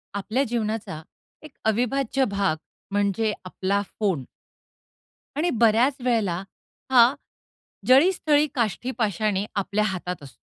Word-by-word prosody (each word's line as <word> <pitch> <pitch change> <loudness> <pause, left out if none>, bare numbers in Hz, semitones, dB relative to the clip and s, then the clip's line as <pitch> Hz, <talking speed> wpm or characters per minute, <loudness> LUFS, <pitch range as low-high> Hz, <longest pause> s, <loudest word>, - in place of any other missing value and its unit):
आपल्या 220 +6 0
जीवनाचा 220 - -3 0.4
एक 310 - -11
अविभाज्य 250 +4 +1
भाग 195 -6 +1 0.3
म्हणजे 205 +2 +1
आपला 190 +2 -1 0.2
फोन. 190 -10 0 1.1
आणि 320 +5 +1
बऱ्याचं 240 +2 +3
वेळेला 205 -8 0 0.5
हा 245 0 +7 0.7
जळी, 275 +9 +6
स्थळी, 300 -4 +2
काष्ठी, 235 +1 -1
पाषाणी 210 -2 0
आपल्या 200 +1 0
हातात 180 -4 -4
असतो. 135 - -12
220 Hz, 110 wpm, -24 LUFS, 195-255 Hz, 1.1 s, हा